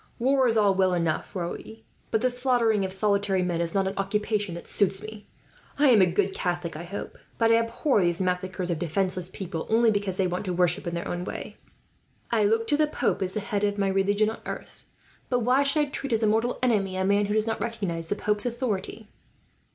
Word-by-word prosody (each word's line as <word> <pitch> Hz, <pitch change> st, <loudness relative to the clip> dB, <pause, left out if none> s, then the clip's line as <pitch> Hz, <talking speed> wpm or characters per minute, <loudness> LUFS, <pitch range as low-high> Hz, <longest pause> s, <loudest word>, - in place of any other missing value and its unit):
"War 265 Hz, +1 st, +3 dB
is 225 Hz, -1 st, +2 dB
all 205 Hz, -2 st, +4 dB
well 185 Hz, -1 st, +2 dB
enough, 170 Hz, +3 st, -2 dB
Raoul, 175 Hz, -2 st, -3 dB, 0.5 s
but 220 Hz, -, +1 dB
the 255 Hz, -, +3 dB
slaughtering 245 Hz, -4 st, +2 dB
of 190 Hz, -, -3 dB
solitary 200 Hz, -1 st, +1 dB
men 175 Hz, -2 st, -1 dB
is 170 Hz, +1 st, -2 dB
not 195 Hz, -1 st, +2 dB
an 190 Hz, -, -2 dB
occupation 205 Hz, -1 st, -1 dB
that 170 Hz, -, -8 dB
suits 195 Hz, 0 st, +1 dB
me. 215 Hz, -1 st, -9 dB, 0.5 s
I 290 Hz, -1 st, +5 dB
am 225 Hz, -5 st, +6 dB
a 185 Hz, -, +5 dB
good 190 Hz, +2 st, 0 dB
Catholic, 175 Hz, -2 st, -2 dB
I 165 Hz, +3 st, -6 dB
hope, 200 Hz, +4 st, -7 dB, 0.2 s
but 225 Hz, -1 st, +3 dB
I 230 Hz, -, +6 dB
abhor 230 Hz, +1 st, +1 dB
these 175 Hz, -1 st, +1 dB
massacres 185 Hz, 0 st, -1 dB
of 165 Hz, -, -2 dB
defenceless 180 Hz, +2 st, -1 dB
people, 180 Hz, -4 st, -5 dB
only 225 Hz, 0 st, +4 dB
because 200 Hz, -3 st, -1 dB
they 190 Hz, -, +2 dB
want 180 Hz, +3 st, -2 dB
to 180 Hz, -, -1 dB
worship 175 Hz, 0 st, +1 dB
in 170 Hz, -, -2 dB
their 170 Hz, -, -4 dB
own 175 Hz, 0 st, -3 dB
way. -, -, -7 dB, 0.7 s
I 220 Hz, -3 st, +3 dB
look 225 Hz, +2 st, +2 dB
to 290 Hz, -, +3 dB
the 305 Hz, 0 st, +3 dB
pope 300 Hz, -, -1 dB
as 190 Hz, 0 st, -2 dB
the 215 Hz, -, -2 dB
head 205 Hz, 0 st, -2 dB
of 205 Hz, 0 st, +1 dB
my 195 Hz, -1 st, +1 dB
religion 200 Hz, +3 st, +2 dB
on -, -, -9 dB
earth, -, -, -8 dB, 0.4 s
but 245 Hz, -1 st, +1 dB
why 250 Hz, +4 st, +3 dB
should 280 Hz, +2 st, +2 dB
I -, -, +2 dB
treat 275 Hz, -3 st, -3 dB
as 225 Hz, 0 st, +1 dB
a -, -, +4 dB
mortal 225 Hz, +3 st, +1 dB
enemy 195 Hz, -6 st, +1 dB
a 190 Hz, -, 0 dB
man 200 Hz, +1 st, +2 dB
who 205 Hz, -, -1 dB
does 215 Hz, 0 st, +2 dB
not 225 Hz, -1 st, -2 dB
recognize 195 Hz, -8 st, -3 dB
the -, -, 0 dB
pope's 210 Hz, +2 st, 0 dB
authority?" 225 Hz, -3 st, -3 dB
200 Hz, 230 wpm, -26 LUFS, 185-225 Hz, 0.7 s, am